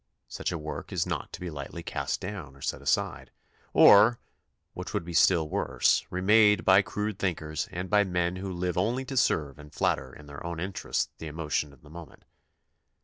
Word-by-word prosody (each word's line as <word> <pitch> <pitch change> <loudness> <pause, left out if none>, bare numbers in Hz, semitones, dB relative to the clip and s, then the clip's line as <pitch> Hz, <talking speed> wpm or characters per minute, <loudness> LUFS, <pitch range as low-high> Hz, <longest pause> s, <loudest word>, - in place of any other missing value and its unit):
Such - - -4
a 85 - -2
work 75 -1 -7
is - - 0
not - - -4
to - - -8
be 90 -1 -5
lightly 70 -2 -7
cast - - -3
down 85 -10 -7
or 70 - -18
set - - -3
aside, 70 +1 -1 0.4
or, 110 +4 +7 0.6
which 90 +3 -6
would 100 -5 -1
be 85 - -7
still 85 -1 +4
worse, - - +1
remade 105 +3 +4
by 95 +1 +7
crude 105 0 -4
thinkers 80 -5 -2
and 90 +2 -4
by 105 +1 +4
men 90 -1 -1
who 95 0 -5
live 90 -1 -2
only 120 +7 0
to 135 - -6
serve 75 - +1
and 75 0 -12
flatter 65 -2 -1
in 75 - -13
their 70 -1 -10
own 85 -1 -5
interest 95 +2 -2
the 80 - -6
emo 75 0 -6
tion 75 -1 0
of 70 -1 -21
the 75 - -15
moment. 85 -2 -12
90 Hz, 200 wpm, -28 LUFS, 75-100 Hz, 0.6 s, or